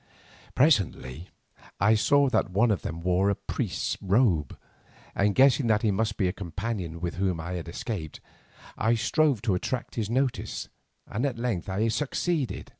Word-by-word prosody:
Presently 95 - +1 0.5
I 105 +4 +5
saw 140 +6 +4
that 125 - +1
one 110 +5 +3
of 95 -8 0
these - - -3
wore 90 +4 +1
a 100 - +1
priest's - - -3
robe, 95 - +2 0.6
and 100 0 +1
guessing 135 -1 +5
that 110 -1 +2
he 110 - +3
must 110 +2 -1
be 95 - +1
my 90 - +2
companion 95 -2 -5
with 85 -1 -4
whom 95 -3 0
I 85 +2 -5
had 85 -2 -4
escaped, 85 - -5 0.6
I 115 +2 +3
strove 130 +1 +1
to 110 -5 +1
attract 120 +7 -3
his 110 -3 -2
notice, 130 +1 -1 0.4
and 115 - -3
at 135 -4 -1
length 115 -7 -2 0.2
succeeded. 150 +2 -2
105 Hz, 160 wpm, -27 LUFS, 90-120 Hz, 0.6 s, I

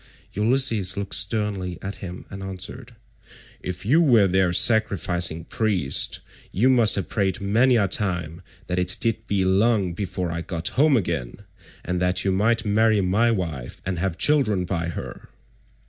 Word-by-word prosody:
Ulysses 110 -4 +1
looked 100 -1 -4
sternly 100 -3 -1
at 100 +1 -6
him 90 -1 -9
and 95 - -8
answered, 95 +6 -8 0.7
"If 90 +2 -6
you 150 +10 +4
were 120 -10 +5
their 95 -1 +1
sacrificing 90 -5 +2
priest, 95 -11 0 0.3
you 120 +8 +2
must 120 -4 +4
have 100 - -3
prayed 95 -4 -1
many 115 +6 +2
a 105 -4 +2
time 85 -4 -2 0.2
that 90 0 -2
it 90 0 0
might 115 -2 -1
be 95 -2 0
long 100 -1 +2
before 90 -2 -4
I 85 0 -4
got 85 -1 -3
home 145 0 +3
again, 85 - -3 0.5
and 90 0 -2
that 90 +1 0
you 95 - +2
might 110 +5 +1
marry 110 +1 +2
my 100 +5 +2
wife 85 - -4
and 90 -2 -3
have 90 -1 -2
children 110 -11 +2
by 85 -2 -3
her. 85 - -8
95 Hz, 160 wpm, -23 LUFS, 90-110 Hz, 0.7 s, were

